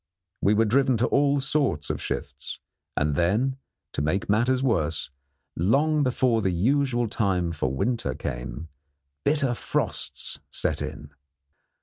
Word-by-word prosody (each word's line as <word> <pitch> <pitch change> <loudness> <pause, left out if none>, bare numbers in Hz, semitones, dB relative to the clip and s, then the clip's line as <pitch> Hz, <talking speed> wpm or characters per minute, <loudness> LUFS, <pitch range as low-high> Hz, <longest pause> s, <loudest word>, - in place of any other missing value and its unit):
We 105 +2 +4
were 115 +2 +4
driven 130 +3 +3
to 115 - +2
all 140 +1 +3
sorts 135 - 0
of - - -4
shifts, - - -5 0.4
and 75 0 +2
then, 105 - +1 0.4
to - - -1
make 80 +7 0
matters 125 +5 +2
worse, 80 - 0 0.4
long 145 - +3
before 125 -3 +2
the 95 - +1
usual 120 +6 +2
time 95 -6 0
for 75 -5 -1
winter 115 - -1
came, 60 +6 -5 0.5
bitter 140 -4 +2
frosts - - -2
set - - -1
in. 75 0 -6
115 Hz, 130 wpm, -26 LUFS, 85-135 Hz, 0.5 s, We